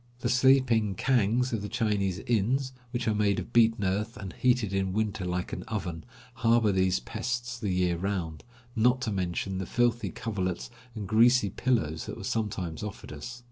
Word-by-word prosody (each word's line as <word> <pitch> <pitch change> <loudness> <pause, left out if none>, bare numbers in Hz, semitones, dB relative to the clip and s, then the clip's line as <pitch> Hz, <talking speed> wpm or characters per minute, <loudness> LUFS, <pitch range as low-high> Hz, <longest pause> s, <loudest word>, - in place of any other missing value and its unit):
The - - 0
sleeping 125 -5 +4
kangs 125 +1 +2
of 110 - -1
the 105 - -5
Chinese 105 -5 0
inns, 125 +4 +1 0.2
which 120 -1 -3
are 110 - +3
made 105 -1 +2
of 120 - -5
beaten 115 -2 +4
earth 105 +5 -1
and 95 -4 -7
heated 120 -5 +1
in 95 -1 0
winter 110 -1 -1
like 90 0 -3
an - - -3
oven, 90 -7 -4 0.3
harbor 115 -2 +3
these 95 -5 +2
pests 125 - -4
the 105 - -2
year 90 -2 +1
round, 90 -5 -3 0.3
not 125 +3 +3
to 115 - -1
mention 95 0 -2
the 95 - -4
filthy 120 -4 +1
coverlets 95 -5 -3 0.2
and 105 -3 -5
greasy 115 -1 +4
pillows 80 -13 0
that - - -6
were - - -8
sometimes 95 -7 -2
offered 105 -6 -7
us. 120 +12 -7
105 Hz, 180 wpm, -28 LUFS, 95-120 Hz, 0.3 s, sleeping